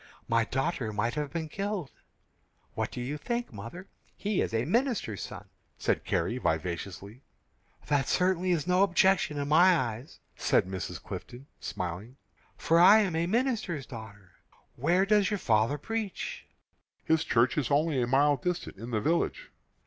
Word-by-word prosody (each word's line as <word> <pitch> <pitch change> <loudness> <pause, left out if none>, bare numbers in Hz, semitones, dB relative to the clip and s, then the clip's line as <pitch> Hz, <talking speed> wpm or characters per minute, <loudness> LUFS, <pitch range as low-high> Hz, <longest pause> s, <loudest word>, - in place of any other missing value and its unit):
My 115 0 +2
daughter 135 -3 -2
might 110 +3 -1
have 150 -2 -3
been 160 0 -3
killed." 195 - -3 0.8
"What - - -2
do - - -7
you 135 +5 -3
think, 235 - -3
mother? 115 - -8 0.3
He 205 -1 0
is - - -1
a 115 +2 0
minister's 225 - 0
son," - - -8 0.3
said - - 0
Carrie, 115 +10 0
vivaciously. 90 - -3 0.6
"That 140 -3 +1
certainly 185 0 +1
is 170 -4 +1
no 180 +1 +3
objection 190 -4 +3
in 140 0 -2
my 175 +4 +6
eyes," 120 0 -4 0.2
said - - +2
Mrs. 95 -1 -5
Clifton, 125 +3 -8
smiling, 95 +8 -5 0.4
"for 165 +1 +3
I 200 +5 +8
am 190 -6 -1
a 165 +1 0
minister's 215 - -1
daughter. 105 -6 -11 0.4
Where 175 +9 +2
does 205 -1 +3
your 210 - 0
father 115 - +2
preach?" 220 +5 -4 0.6
"His 160 0 +2
church 125 -2 +2
is 150 -6 0
only 145 -1 +2
a 120 - 0
mile 140 +3 +4
distant, 180 - -3
in 115 +4 -7
the 110 -3 -1
village." 170 - -1
150 Hz, 155 wpm, -29 LUFS, 115-185 Hz, 0.8 s, I